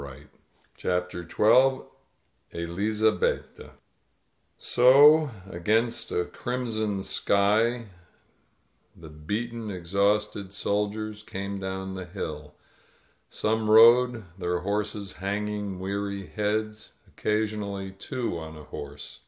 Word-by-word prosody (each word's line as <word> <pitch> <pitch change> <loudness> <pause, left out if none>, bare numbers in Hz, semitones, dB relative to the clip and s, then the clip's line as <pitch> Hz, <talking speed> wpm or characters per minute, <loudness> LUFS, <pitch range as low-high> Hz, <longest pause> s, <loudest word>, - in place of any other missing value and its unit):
• - - -7
• 70 - -10
• - - -14 0.6
CHAPTER 90 -1 -2
Xn 130 +10 +3 0.7
ELIZABETTA 105 +6 -1 0.8
SO, 145 +5 +6 0.2
against 110 +7 0
a 90 - 0
crimson 110 -5 -3
sky, 110 +6 +2 1.1
the 80 -2 -11
beaten, 105 +9 -4
exhausted 100 +2 0
soldiers 105 +1 -2
came 100 -1 -5
down 95 0 -4
the 95 -1 -6
hill. 75 -5 -7 0.7
Some 110 0 -1
rode, 120 +1 +6 0.2
their 90 -1 -1
horses 100 0 -3
hanging 100 0 -3
we&ry 100 +1 -3
heads 110 0 -3
— - - -36
occasionally 105 -2 -2
two 100 -1 -4
on 80 -1 -9
a 75 - -11
horse. 75 0 -9
105 Hz, 100 wpm, -27 LUFS, 95-110 Hz, 1.1 s, SO